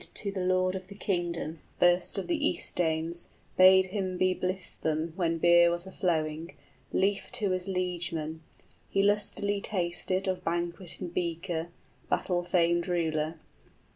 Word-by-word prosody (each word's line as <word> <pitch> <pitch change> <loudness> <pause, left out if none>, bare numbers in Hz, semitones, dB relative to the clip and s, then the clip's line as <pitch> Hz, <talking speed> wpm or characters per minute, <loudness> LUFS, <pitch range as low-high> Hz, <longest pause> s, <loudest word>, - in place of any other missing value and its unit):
} - - -32
To 200 - -2
the 190 -2 -3
lord 185 0 +2
of 185 -1 -6
the 200 - -11
kingdom, 175 -5 -2 0.2
first 175 +2 +3
of 195 - -2
the 315 -3 +1
East - - -1
Danes, 165 0 0 0.3
60 - - -33
Bade 190 0 +7
him 185 -1 -3
be 185 0 +3
blithesome 170 -4 -2
when 165 -3 0
beer 170 +1 +6
was 175 +1 -1
a 190 - -9
flowing, 160 -3 -1 0.4
Lief 195 +1 0
to 215 -6 +1
his 185 0 -2
liegemen; 175 -4 -2 0.5
he 195 - +2
lustily 205 0 +1
tasted 185 0 0
Of 185 -1 -1
banquet 170 +1 -3
and 175 -2 -5
beaker, 170 -1 -2 0.4
battle 180 -2 0
famed 170 -1 +2
ruler. 160 -2 -1
180 Hz, 155 wpm, -29 LUFS, 170-190 Hz, 0.5 s, Bade